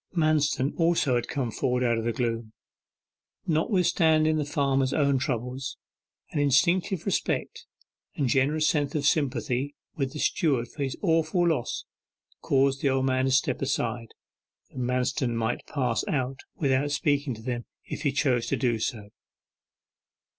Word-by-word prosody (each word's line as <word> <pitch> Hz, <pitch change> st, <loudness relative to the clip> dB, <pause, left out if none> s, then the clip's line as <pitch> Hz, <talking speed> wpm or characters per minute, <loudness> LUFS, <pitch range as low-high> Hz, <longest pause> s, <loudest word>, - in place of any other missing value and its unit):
Manston 150 Hz, -4 st, +2 dB
also 165 Hz, -5 st, +3 dB
had 120 Hz, -1 st, 0 dB
come 130 Hz, -5 st, -2 dB
forward 125 Hz, +3 st, 0 dB
out 115 Hz, -2 st, +2 dB
of -, -, -3 dB
the 120 Hz, -, +1 dB
gloom. 115 Hz, -1 st, -2 dB, 0.9 s
Notwithstanding 160 Hz, -2 st, +2 dB
the 150 Hz, -, 0 dB
farmer's 135 Hz, -2 st, +1 dB
own 140 Hz, -3 st, +2 dB
troubles, 125 Hz, +1 st, -3 dB, 0.5 s
an -, -, -1 dB
instinctive 170 Hz, -, +2 dB
respect -, -, -2 dB, 0.5 s
and 140 Hz, -, 0 dB
generous 145 Hz, +5 st, +2 dB
sense 145 Hz, -2 st, 0 dB
of 145 Hz, -2 st, 0 dB
sympathy 140 Hz, -2 st, 0 dB, 0.2 s
with 135 Hz, -3 st, -2 dB
the 150 Hz, -, -6 dB
steward 135 Hz, -9 st, +1 dB
for 145 Hz, -, -9 dB
his 135 Hz, -2 st, -2 dB
awful 165 Hz, 0 st, +2 dB
loss 150 Hz, -8 st, -2 dB, 0.6 s
caused 135 Hz, 0 st, +2 dB
the 140 Hz, -, +2 dB
old 130 Hz, 0 st, +1 dB
man 130 Hz, 0 st, +1 dB
to 135 Hz, -, +1 dB
step 135 Hz, 0 st, +1 dB
aside, 120 Hz, -4 st, -2 dB, 0.6 s
that -, -, -8 dB
Manston 125 Hz, 0 st, 0 dB
might 115 Hz, +1 st, -2 dB
pass 125 Hz, -6 st, 0 dB
out 130 Hz, -2 st, -1 dB, 0.2 s
without 140 Hz, -1 st, +1 dB
speaking 145 Hz, -2 st, 0 dB
to 110 Hz, -, -12 dB
them 120 Hz, -1 st, -3 dB, 0.2 s
if -, -, -6 dB
he 145 Hz, -, +1 dB
chose 130 Hz, -4 st, +1 dB
to -, -, 0 dB
do 120 Hz, -4 st, 0 dB
so. 110 Hz, -3 st, -3 dB
135 Hz, 150 wpm, -27 LUFS, 125-150 Hz, 0.9 s, also